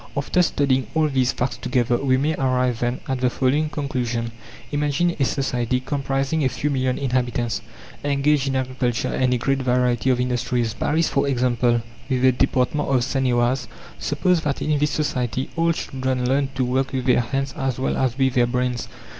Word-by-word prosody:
After 145 Hz, +5 st, +2 dB
studying 135 Hz, -7 st, +1 dB
all 155 Hz, -1 st, +3 dB
these 130 Hz, -2 st, +2 dB
facts 125 Hz, -1 st, -2 dB
together, 120 Hz, -2 st, +1 dB
we 130 Hz, -1 st, +2 dB
may 150 Hz, +4 st, +1 dB
arrive, 125 Hz, -4 st, 0 dB
then, 120 Hz, +1 st, -1 dB
at 130 Hz, -1 st, -1 dB
the 125 Hz, -, +3 dB
following 140 Hz, +5 st, +1 dB
conclusion: 125 Hz, -6 st, -2 dB, 0.4 s
Imagine 150 Hz, +4 st, +1 dB
a -, -, +3 dB
society, 125 Hz, -2 st, 0 dB
comprising 135 Hz, +2 st, -1 dB
a 130 Hz, -, +3 dB
few 150 Hz, +3 st, -2 dB
million 130 Hz, -2 st, 0 dB
inhabitants, 120 Hz, -5 st, -1 dB, 0.4 s
engaged 145 Hz, 0 st, +2 dB
in 135 Hz, -, -1 dB
agriculture 130 Hz, -2 st, -1 dB
and 130 Hz, -1 st, +1 dB
a 125 Hz, -, +2 dB
great 135 Hz, +3 st, 0 dB
variety 125 Hz, -1 st, +1 dB
of 125 Hz, -1 st, +2 dB
industries 125 Hz, -2 st, 0 dB
Paris, 160 Hz, +7 st, +1 dB
for 140 Hz, +1 st, +1 dB
example, 120 Hz, -2 st, +1 dB, 0.3 s
with 130 Hz, -1 st, 0 dB
the 130 Hz, -, +7 dB
Department 130 Hz, +3 st, +1 dB
of 130 Hz, -3 st, +2 dB
Seine 135 Hz, 0 st, 0 dB
et -, -, +2 dB
Oise. 125 Hz, +2 st, +1 dB, 0.3 s
Suppose 180 Hz, -3 st, +1 dB
that 145 Hz, -3 st, -2 dB
in 150 Hz, -1 st, +1 dB
this 150 Hz, +1 st, +2 dB
society 130 Hz, -5 st, -2 dB
all 165 Hz, 0 st, +2 dB
children 130 Hz, -5 st, -2 dB
learn 135 Hz, +1 st, +1 dB
to 130 Hz, -1 st, +1 dB
work 130 Hz, +2 st, 0 dB
with 130 Hz, -1 st, -2 dB
their 125 Hz, -1 st, +4 dB
hands 135 Hz, +3 st, -2 dB
as 135 Hz, -2 st, -2 dB
well 130 Hz, -, -1 dB
as 130 Hz, -1 st, 0 dB
with 130 Hz, -2 st, +2 dB
their 120 Hz, -1 st, +3 dB
brains. 125 Hz, 0 st, -1 dB
130 Hz, 190 wpm, -22 LUFS, 125-140 Hz, 0.4 s, the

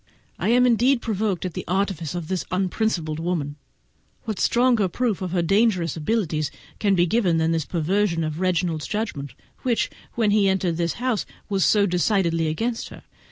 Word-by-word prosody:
I -, -, 0 dB
am, 250 Hz, +2 st, +5 dB
indeed, 245 Hz, +2 st, +4 dB
provoked 210 Hz, -6 st, -1 dB
at 180 Hz, -, -3 dB
the -, -, -4 dB
artifice 180 Hz, -4 st, -1 dB
of 175 Hz, -3 st, -4 dB
this 185 Hz, 0 st, -1 dB
unprincipled 185 Hz, -4 st, -1 dB
woman; 160 Hz, -4 st, -2 dB, 0.7 s
what 220 Hz, -4 st, -4 dB
stronger 240 Hz, -4 st, +3 dB
proof 220 Hz, 0 st, -1 dB
of 185 Hz, -, -2 dB
her 175 Hz, 0 st, 0 dB
dangerous 190 Hz, -3 st, +2 dB
abilities 160 Hz, -3 st, -1 dB, 0.3 s
can 200 Hz, -2 st, +3 dB
be 175 Hz, -1 st, +4 dB
given 180 Hz, -3 st, +2 dB
than 160 Hz, 0 st, +2 dB
this 165 Hz, -2 st, 0 dB
perversion 175 Hz, +1 st, 0 dB
of 155 Hz, 0 st, -3 dB
Reginald's 175 Hz, -4 st, 0 dB
judgment, 145 Hz, -, -4 dB, 0.3 s
which 240 Hz, -3 st, 0 dB, 0.2 s
when 220 Hz, -3 st, +2 dB
he 205 Hz, -2 st, +4 dB
entered 185 Hz, -3 st, 0 dB
the 170 Hz, -1 st, +1 dB
house 245 Hz, -3 st, -1 dB, 0.2 s
was 195 Hz, -3 st, +1 dB
so 205 Hz, -2 st, +4 dB
decidedly 175 Hz, -3 st, +1 dB
against 225 Hz, +10 st, -2 dB
her! -, -, -12 dB
185 Hz, 170 wpm, -23 LUFS, 165-220 Hz, 0.7 s, am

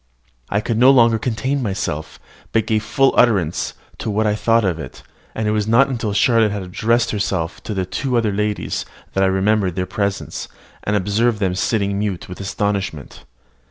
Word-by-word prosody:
I 100 Hz, -, +1 dB
could 115 Hz, 0 st, -1 dB
no 125 Hz, +2 st, +7 dB
longer 115 Hz, -4 st, +5 dB
contain 130 Hz, +4 st, -1 dB
myself, 95 Hz, -8 st, -3 dB, 0.3 s
but 110 Hz, -1 st, +2 dB
gave 110 Hz, -1 st, +1 dB
full 125 Hz, +5 st, +2 dB
utterance 100 Hz, -10 st, +2 dB, 0.2 s
to -, -, -3 dB
what 110 Hz, +1 st, +1 dB
I 105 Hz, -, +2 dB
thought 115 Hz, +1 st, +2 dB
of 85 Hz, -3 st, 0 dB
it: 65 Hz, -5 st, -9 dB, 0.3 s
and 110 Hz, -1 st, -1 dB
it -, -, +2 dB
was 105 Hz, -1 st, 0 dB
not 120 Hz, +5 st, +4 dB
until 115 Hz, -5 st, -2 dB
Charlotte 110 Hz, +1 st, +3 dB
had 100 Hz, -1 st, -3 dB
addressed 115 Hz, +6 st, +1 dB
herself 95 Hz, -5 st, -2 dB
to 105 Hz, -, -5 dB
the 95 Hz, -1 st, -1 dB
two 125 Hz, +7 st, -1 dB
other 110 Hz, -3 st, +1 dB
ladies, 105 Hz, +1 st, -2 dB, 0.3 s
that 95 Hz, -, +2 dB
I -, -, +4 dB
remembered 95 Hz, -1 st, +1 dB
their 90 Hz, -1 st, -1 dB
presence, 100 Hz, +1 st, -3 dB, 0.4 s
and 105 Hz, -, 0 dB
observed 105 Hz, +4 st, +1 dB
them 95 Hz, -3 st, +1 dB
sitting 100 Hz, +1 st, 0 dB
mute 100 Hz, -4 st, -3 dB
with 90 Hz, +1 st, -8 dB
astonishment. 95 Hz, -8 st, -3 dB
105 Hz, 185 wpm, -20 LUFS, 95-115 Hz, 0.4 s, no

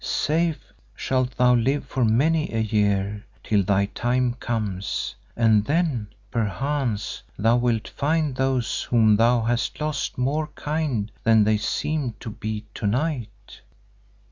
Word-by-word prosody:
Safe 160 Hz, +1 st, -1 dB, 0.2 s
shalt 130 Hz, 0 st, -1 dB
thou 125 Hz, 0 st, +5 dB
live 135 Hz, +4 st, +1 dB
for 130 Hz, -1 st, -1 dB
many 150 Hz, +8 st, +2 dB
a 115 Hz, -, -2 dB
year, 105 Hz, -2 st, 0 dB, 0.2 s
till 105 Hz, -2 st, +2 dB
thy 100 Hz, +1 st, +2 dB
time 125 Hz, +3 st, 0 dB
comes, 105 Hz, -6 st, -3 dB, 0.2 s
and 110 Hz, -3 st, +4 dB
then, 145 Hz, -8 st, 0 dB, 0.2 s
perchance, 115 Hz, +1 st, -2 dB, 0.2 s
thou 115 Hz, +3 st, +3 dB
wilt 120 Hz, -2 st, 0 dB
find 150 Hz, -1 st, 0 dB
those 130 Hz, -2 st, 0 dB
whom 110 Hz, -3 st, +4 dB
thou 120 Hz, +2 st, +4 dB
hast 120 Hz, +5 st, -1 dB
lost 150 Hz, -2 st, -2 dB
more 145 Hz, +5 st, 0 dB
kind 145 Hz, -9 st, -2 dB
than 110 Hz, -1 st, +5 dB
they 110 Hz, +1 st, +3 dB
seemed 135 Hz, +3 st, -2 dB
to 110 Hz, -, -6 dB
be 110 Hz, -1 st, -5 dB
to 105 Hz, -, -2 dB
night." 115 Hz, -5 st, -3 dB
120 Hz, 135 wpm, -24 LUFS, 110-135 Hz, 0.2 s, thou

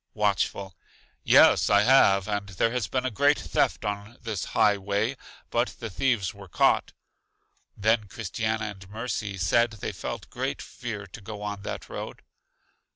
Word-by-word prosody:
Watchful: 100 Hz, -2 st, 0 dB, 0.5 s
Yes, -, -, +6 dB
I 100 Hz, 0 st, +5 dB
have, 100 Hz, -7 st, +5 dB
and 100 Hz, -1 st, -2 dB
there 100 Hz, +4 st, +1 dB
has 125 Hz, -4 st, -1 dB
been 130 Hz, 0 st, -1 dB
a 130 Hz, -, 0 dB
great 145 Hz, +6 st, +3 dB
theft -, -, 0 dB
on 105 Hz, +3 st, -4 dB
this 110 Hz, -5 st, -4 dB
high 105 Hz, -1 st, +5 dB
way; 105 Hz, +6 st, -1 dB, 0.4 s
but 120 Hz, +1 st, 0 dB
the 115 Hz, -3 st, -5 dB
thieves 115 Hz, -4 st, 0 dB
were 100 Hz, -1 st, -12 dB
caught. -, -, +2 dB, 0.8 s
Then 110 Hz, +1 st, +2 dB
Christiana 110 Hz, +2 st, -2 dB
and 100 Hz, -2 st, -8 dB
Mercy 110 Hz, -2 st, -4 dB
said 115 Hz, +6 st, +2 dB
they 110 Hz, -, -5 dB
felt -, -, -6 dB
great -, -, -3 dB
fear 105 Hz, -4 st, -6 dB
to 100 Hz, +3 st, -12 dB
go 105 Hz, 0 st, -8 dB
on 105 Hz, -1 st, -4 dB
that -, -, -6 dB
road. -, -, -7 dB
105 Hz, 155 wpm, -27 LUFS, 100-115 Hz, 0.8 s, Yes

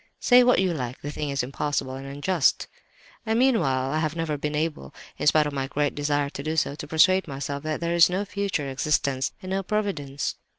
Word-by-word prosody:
Say 250 Hz, 0 st, +6 dB
what 250 Hz, 0 st, +4 dB
you 185 Hz, -2 st, +2 dB
like—the 130 Hz, 0 st, -5 dB
thing 150 Hz, 0 st, -4 dB
is 140 Hz, -2 st, -1 dB
impossible 140 Hz, 0 st, -2 dB
and 135 Hz, +1 st, -7 dB
unjust! 145 Hz, +3 st, +1 dB, 0.6 s
"And 220 Hz, 0 st, 0 dB
meanwhile 135 Hz, -, +2 dB
I 155 Hz, -, 0 dB
have 155 Hz, 0 st, -1 dB
never 165 Hz, -2 st, -2 dB
been 150 Hz, +1 st, -3 dB
able, 150 Hz, -, -3 dB, 0.2 s
in -, -, 0 dB
spite 155 Hz, 0 st, +5 dB
of 145 Hz, -, -3 dB
my 135 Hz, -1 st, -2 dB
great 145 Hz, +1 st, -1 dB
desire 145 Hz, -1 st, -1 dB
to 140 Hz, -, -6 dB
do 155 Hz, +2 st, -3 dB
so, 145 Hz, -, +1 dB
to 150 Hz, -, -8 dB
persuade 185 Hz, +4 st, +4 dB
myself 140 Hz, 0 st, -4 dB
that 155 Hz, +1 st, -3 dB
there 170 Hz, 0 st, -1 dB
is 170 Hz, 0 st, +6 dB
no 190 Hz, +3 st, -1 dB
future 200 Hz, -7 st, -2 dB
existence, 135 Hz, -1 st, 0 dB
and 185 Hz, -, -6 dB
no 195 Hz, +1 st, 0 dB
Providence. 180 Hz, -10 st, -2 dB
150 Hz, 210 wpm, -25 LUFS, 140-180 Hz, 0.6 s, Say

